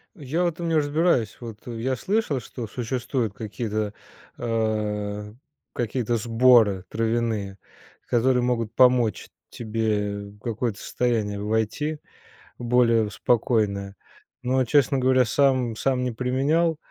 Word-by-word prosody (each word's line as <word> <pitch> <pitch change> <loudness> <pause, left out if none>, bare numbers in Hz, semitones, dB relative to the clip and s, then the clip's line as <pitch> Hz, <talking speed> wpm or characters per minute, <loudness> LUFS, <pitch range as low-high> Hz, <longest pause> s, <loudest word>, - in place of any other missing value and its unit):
Я 155 +1 -2
в - - +3
этом 170 0 -3
не 165 - +1
разбираюсь, 145 -6 +1
вот 115 -3 -9
я 120 +2 -2
слышал, 185 - -1
что 115 0 -7
существуют 120 -1 -2
какие-то, 105 -1 -3 0.4
а, 105 -2 -2 0.4
какие-то 120 0 -1
сборы 115 -4 +4
травяные, 110 -3 -1 0.5
которые 125 +1 +2
могут 115 -2 -1
помочь 125 -4 +3 0.2
тебе 105 -3 -2
в 105 - -19
какое-то 115 -1 -3
состояние 110 -5 -1
войти, 110 +9 -1 0.6
в 120 - -7
более 115 -2 +3
в 105 - -9
спокойное, 105 -5 0 0.5
но, 130 +1 +2
честно 140 +2 +3
говоря, 130 0 +4
сам 125 -2 +1
сам 130 0 0
не 125 - -1
применял, 140 +7 +1
120 Hz, 120 wpm, -24 LUFS, 110-130 Hz, 0.6 s, сборы